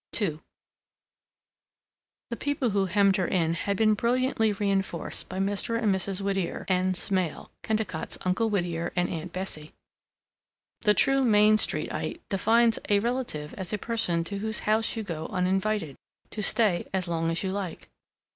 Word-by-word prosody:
II 160 -8 -1 1.9
The - - -1
people 280 -3 -1
who 195 -1 +1
hemmed 200 +1 +3
her 185 -3 0
in 165 -3 +1
had 200 +3 -2
been 215 0 +4
brilliantly 235 0 +1
reinforced 195 -4 -2
by 185 - -5
Mr. 205 +4 0
and 215 -4 +2
Mrs. 190 0 -2
Whittier 195 -3 -2
N. 185 0 +2
Smail 185 -3 0
Kennicott's 215 -7 -2
Uncle 205 +5 +1
Whittier 175 -5 -1
and 180 0 +2
Aunt 170 +1 -5
Bessie. 165 -4 -6 1.1
The 210 0 +4
true 270 0 +3
Main 215 -2 +5
Streetite 330 - -1
defines 225 +4 +3
a 205 - +5
relative 230 -10 -2
as 190 -3 -6
a - - +1
person 195 -7 0
to 200 +4 -5
whose 220 +1 -3
house 220 +2 +1
you 225 - -3
go 160 -5 -5
uninvited, 190 -3 0 0.4
to 215 - -4
stay 200 -3 +2
as 185 -2 -1
long 165 -1 0
as 165 +3 -2
you 190 - -1
like. 195 -3 -5
195 Hz, 155 wpm, -27 LUFS, 180-220 Hz, 1.9 s, Main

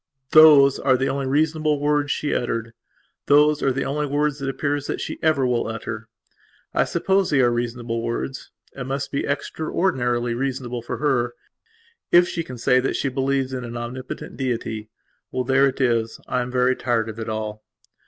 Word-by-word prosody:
Those 150 -3 +8
are 130 -2 +3
the 135 +2 0
only 135 0 -2
reasonable 155 +1 +1
words 145 0 +1
she 150 - -1
uttered; 115 -1 -2 0.5
those 150 +1 +5
are 135 - +2
the 135 +1 -2
only 150 +2 -1
words, 145 0 0
it 135 - -2
appears, 145 +1 -2
that - - -3
she - - -5
ever 155 -5 +2
will 120 -2 0
utter. 115 0 -5 0.7
I - - +2
suppose 195 -1 +1
that - - +1
they 135 - +5
are 120 - +4
reasonable 120 -1 -2
words; 120 +3 -4 0.3
it 135 - -5
must 135 +1 -3
be 140 - -2
extraordinarily 130 -5 -1
reasonable 125 -1 -3
for 115 - -5
her, 125 -5 0 0.8
if 175 0 +6
she 170 -2 -3
can 125 -5 -9
say 125 +2 +3
that 130 - -1
she 140 - 0
believes 135 0 -1
in 125 -1 -4
an 120 0 -6
Omnipotent 125 +2 -7
Deity. 115 -4 -3 0.4
Well, 130 - -1
there 135 +2 +4
it 135 - -4
is. 115 -3 0
I 125 - 0
am 125 - -4
very 125 0 +2
tired 120 -3 0
of 110 0 -7
it 110 - -4
all.... 110 0 -4
130 Hz, 185 wpm, -23 LUFS, 120-145 Hz, 0.8 s, Those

